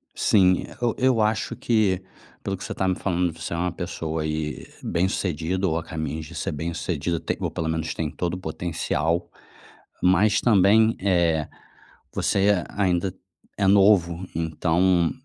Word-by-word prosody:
Sim, 95 -3 +4
e - - -9
eu 120 -1 +1
eu 130 -3 +3
acho 110 +1 0
que, 105 -5 +1 0.4
pelo 100 0 -2
que - - -9
você - - -4
tá 95 - -1
me 95 - +1
falando, 90 -2 0
você 85 - -5
é - - -2
uma 90 +1 0
pessoa 80 -3 -4
e 75 -1 -3 0.2
bem-sucedido 90 0 -1
ou 80 - 0
a 85 - -3
caminhos 80 -2 -4
de 85 +3 -11
ser - - -2
bem-sucedido, 85 +1 -3 0.2
ou - - -2
pelo 80 - -3
menos 80 0 -2
tem 80 -2 -2
todo 85 +4 -3
o 90 - -3
potencial, 85 0 -2 0.7
mas 95 +4 +4
também, 110 +1 +4
eh, 85 -5 +2 0.7
você 100 -2 +2
a 100 - -3
ainda 90 0 +1 0.5
é 100 - +2
novo, 95 -3 +4
então 85 +2 +2
90 Hz, 155 wpm, -24 LUFS, 80-95 Hz, 0.7 s, Sim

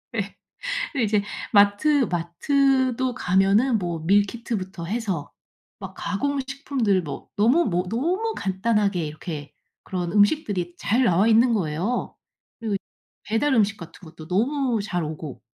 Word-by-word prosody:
예. 200 -2 -3 0.6
근데 260 -6 0
이제 210 -1 +2 0.3
마트 205 +7 +4
마트도 260 - +1
가면은 200 +4 +3
뭐 170 -3 -3
밀키트부터 200 -2 0
해서 195 -8 -3 0.5
막 190 -1 -8
가공 280 +8 -1
식품들 260 -8 0
뭐 145 -3 -7
너무 245 +12 +4
뭐 180 -2 0
너무 365 - -1
간단하게 195 -3 0
이렇게 150 -1 -7 0.3
그런 175 -2 -3
음식들이 205 - +2
잘 240 +5 +2
나와 195 +2 +3
있는 230 +2 +5
거예요. 185 +6 -1 0.5
그리고 220 -3 -2
이 - - 0 0.5
배달 260 +6 +1
음식 210 -2 +2
같은 165 +1 -11
것도 160 0 -12
너무 240 +4 +1
잘 180 -4 -2
오고. 150 -3 -7
205 Hz, 275 characters per minute, -24 LUFS, 180-245 Hz, 0.6 s, 있는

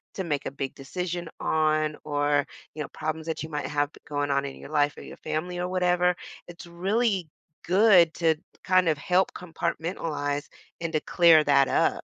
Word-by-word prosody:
to 190 - -2
make 145 -4 -2
a - - -3
big 135 -1 -5
decision 175 +4 -4
on 155 -1 +1
or, 145 -1 +1 0.3
you 155 - -4
know, - - -5
problems 155 +1 -4
that 160 - -3
you 160 - -6
might 150 -1 -3
have 145 -1 0 0.2
going 145 -1 -2
on 140 0 +1
in 135 - -7
your - - -11
life 145 -1 +1
or - - -9
your - - -11
family 160 +3 -3
or 180 0 -2
whatever, 180 -1 +2 0.3
it's 175 0 -11
really 190 +1 0 0.3
good 185 -3 +5
to 165 -2 +2 0.3
kind 185 -2 +4
of 155 - +1
help 180 +6 +1
compartmentalize 160 -4 -3 0.3
and 165 - -2
to 155 - +2
clear 165 -3 +5
that 140 -1 +4
up, - - +1
160 Hz, 185 wpm, -26 LUFS, 145-180 Hz, 0.3 s, good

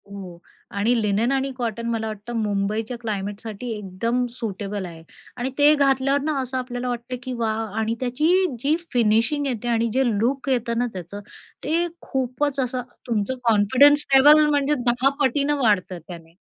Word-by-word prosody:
हो. 190 -4 -9 0.3
आणि 205 +4 +1
लिनेन 210 +4 +1
आणि 270 0 0
कॉटन 230 -2 -3
मला 225 -1 -2
वाटतं 215 +2 -7
मुंबईच्या 215 +3 -2
क्लायमेटसाठी 215 +1 -5
एकदम 230 +5 -2
सुटेबल 205 -4 -5
आहे. 165 -2 -10 0.3
आणि 250 +1 -2
ते 295 +1 +6
घातल्यावर 275 0 +2
ना, 300 0 -1
असं 260 0 -4
आपल्याला 250 -1 -4
वाटत 240 +1 -4
की 255 - -4
वाह! 225 -1 -1
आणि 225 +1 0
त्याची 305 +10 +2
जी 285 +6 +2 0.2
फिनिशिंग 230 +5 +2
येते, 240 -2 -3
आणि 235 -1 +1
जे 265 +2 +3
लूक 245 +6 -1
येतं 235 -2 0
ना 245 - +2
त्याचं, 185 +2 -7 0.4
ते 335 +4 +1
खूपच 265 +2 -2
असं 255 -1 -1 0.3
तुमचं 225 +1 -1
कॉन्फिडन्स 250 +7 +5
लेव्हल 300 +3 +7
म्हणजे 290 0 +2
10 245 +3 +3
पटीनं 285 +2 +1
वाढतं 200 -6 +1
त्याने. 165 -2 -11
240 Hz, 155 wpm, -23 LUFS, 210-270 Hz, 0.4 s, लेव्हल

